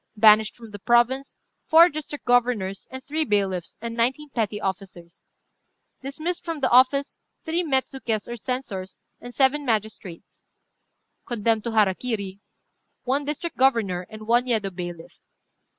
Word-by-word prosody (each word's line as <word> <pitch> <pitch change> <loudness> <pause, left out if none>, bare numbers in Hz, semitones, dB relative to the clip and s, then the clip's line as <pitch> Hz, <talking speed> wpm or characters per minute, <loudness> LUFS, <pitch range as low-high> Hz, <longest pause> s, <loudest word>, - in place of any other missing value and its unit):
"Banished 215 0 +6
from 230 -3 -13
the 205 - -9
province, 240 +5 +2 0.3
four 330 +2 +8
district 300 -2 -7
governors, 240 -6 +1
and 260 0 -8
three 310 +3 -1
bailiffs, 195 - -1
and 230 0 -5
nineteen 260 +6 0
petty 215 -4 -2
officers. 190 -3 -6 0.7
"Dismissed 310 +6 -4
from 330 -3 -4
office, 260 +3 +4 0.3
three 330 +2 0
metsukés, 265 -6 -1
or 240 - -5
censors, 230 -6 -5 0.2
and 245 - -9
seven 270 +3 +2
magistrates. 215 -7 -4 0.8
"Condemned 225 -1 0
to 235 - -3
hara 210 -4 +4
kiri, 200 -4 -4 0.6
one 275 +3 0
district 305 +3 -4
governor 215 -9 +1
and 215 0 -10
one 240 +3 +2
Yedo 215 -5 0
bailiff. 175 -2 -8
235 Hz, 135 wpm, -24 LUFS, 205-270 Hz, 0.8 s, four